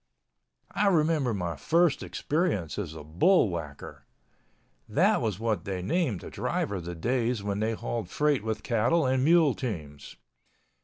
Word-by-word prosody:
I 205 - +1
remember 155 -7 +2
my 90 -5 -3
first 165 - +2
experience 145 - -1
as 85 -6 -5
a 80 - -8
bullwhacker—that 85 - -1
was 105 -4 -2
what 110 -2 -1
they 95 -3 -4
named 155 - 0
a - - -8
driver 100 -3 -2
the 85 +1 -6
days 120 +3 -1
when 100 0 -2
they 110 +1 0
hauled 110 -3 -4
freight 150 -2 +1
with 110 -1 -3
cattle 120 +7 +2
and 130 0 +1
mule 160 -2 +5
teams. 75 - -6
110 Hz, 140 wpm, -28 LUFS, 90-150 Hz, -, mule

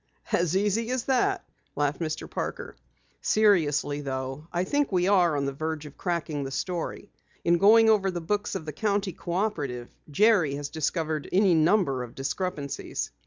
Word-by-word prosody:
"As 175 +1 +2
easy 210 +3 0
as 255 -1 -1
that?" 380 +8 +1 0.3
laughed 145 0 0
Mr. 160 -1 -3
Parker. - - -5 0.5
"Seriously 155 -9 +2
though, 135 +2 -5
I 175 +1 0
think 285 +7 0
we 180 -1 +2
are 175 -6 +4
on 140 - 0
the 140 - -2
verge 155 +1 -4
of 150 - -11
cracking 165 -5 -2
the 135 - -4
story. 175 +7 -4 0.3
In 170 0 +4
going 225 +4 +7
over 210 -3 +4
the 175 -2 -3
books 205 +5 -2
of 155 - -4
the 150 - -5
County 200 +2 -1
Cooperative, 165 - -3 0.2
Jerry 180 -3 +3
has 145 0 -5
discovered 155 -1 -2
any 190 -1 +4
number 160 -4 +3
of 120 -1 -8
discrepancies." 140 +1 -3
170 Hz, 165 wpm, -27 LUFS, 145-205 Hz, 0.5 s, going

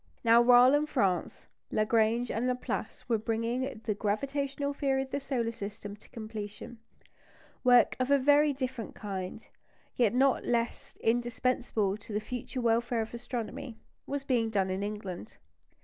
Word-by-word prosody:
Now, 230 0 +6
while 245 +2 +7
in 295 +1 +2
France 195 - 0 0.2
Lagrange 225 +2 +2
and 235 +3 -1
Laplace 250 0 -3
were 230 -3 +1
bringing 230 +3 -2
the 215 - 0
gravitational 275 +7 -2
theory 270 -1 0
of 265 - -12
the 280 - -1
solar 250 -5 -1
system 205 -1 -7
to - - -20
completion, 215 +1 -7 0.8
work 245 -1 +5
of 255 +1 0
a 280 - +6
very 290 +2 +4
different 260 -4 -4
kind, 195 +1 -5 0.5
yet 235 -2 +2
not 265 +1 +3
less 235 -1 -2
indispensable 235 -3 0
to 210 0 -10
the 210 - +1
future 250 +3 -5
welfare 235 0 +1
of 220 - -6
astronomy, 235 0 -5 0.3
was 280 0 -3
being 245 -5 +1
done 195 -3 0
in 190 +1 -2
England. 200 - -6
235 Hz, 150 wpm, -30 LUFS, 215-255 Hz, 0.8 s, while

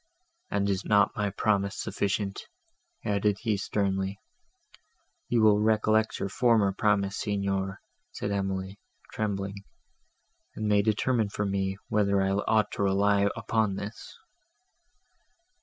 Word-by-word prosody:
"And 100 0 0
is 95 -1 0
not 105 -1 +3
my 105 -1 0
promise 100 0 0
sufficient?" 100 0 -2 0.6
added 105 0 +1
he 110 -2 +1
sternly. 95 -1 -1 1.1
"You 115 -2 +3
will 105 -1 +5
recollect 110 0 +2
your - - -2
former 110 -1 +3
promise, 100 -1 +1
Signor," 100 -1 -1 0.3
said 100 - -4
Emily, 95 0 -3 0.3
trembling, 100 -2 -3 0.9
"and 110 - -2
may 105 -1 +4
determine 110 +1 +1
for 105 +1 -2
me, 95 -1 -1
whether 100 -2 +2
I 95 0 +1
ought 105 +2 +1
to - - -4
rely 100 +1 +3
upon 110 -3 0
this." 100 +3 -8
100 Hz, 120 wpm, -28 LUFS, 100-105 Hz, 1.1 s, will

